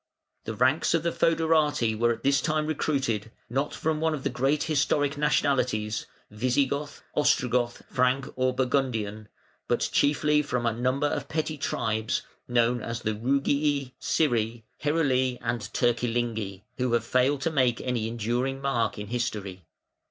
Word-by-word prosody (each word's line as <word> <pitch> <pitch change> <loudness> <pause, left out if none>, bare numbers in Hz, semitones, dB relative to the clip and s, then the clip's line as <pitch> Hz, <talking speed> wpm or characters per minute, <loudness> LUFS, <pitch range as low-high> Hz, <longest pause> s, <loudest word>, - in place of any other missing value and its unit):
The 110 - -4
ranks 130 +8 +3
of 165 - 0
the 170 - +1
fœderati 155 -9 +2
were 120 +2 +2
at 115 - -4
this 140 0 +3
time 155 -1 0
recruited, 135 -8 -1 0.2
not 135 +4 0
from 155 -1 -1
one 160 -1 +1
of 135 - -7
the 140 - 0
great 135 +4 +1
historic 145 -1 +1
nationalities 130 -7 +1 0.2
Visigoth, 135 +6 -1
Ostrogoth, 125 -4 +1
Frank, 125 0 +1
or 130 0 +2
Burgundian, 125 -5 -1 0.4
but - - +1
chiefly 150 +1 +3
from 125 -4 -2
a 115 - +2
number 130 +5 0
of 145 -1 -2
petty 155 0 -1
tribes, 110 -6 -1 0.2
known 120 0 +2
as 115 +1 -4
the 110 - -1
Rugii, 140 +3 +1
Scyri, 120 -6 +1 0.2
Heruli, 130 -5 +1
and 120 -1 -2
Turcilingi, 115 -5 -1 0.2
who 125 -1 +1
have 115 -1 +2
failed 130 +3 +2
to 160 - 0
make 130 -5 +2
any 120 -3 -1
enduring 120 +4 -1
mark 135 -5 0
in 105 - -5
history. 105 -7 -3
130 Hz, 145 wpm, -27 LUFS, 115-145 Hz, 0.4 s, ranks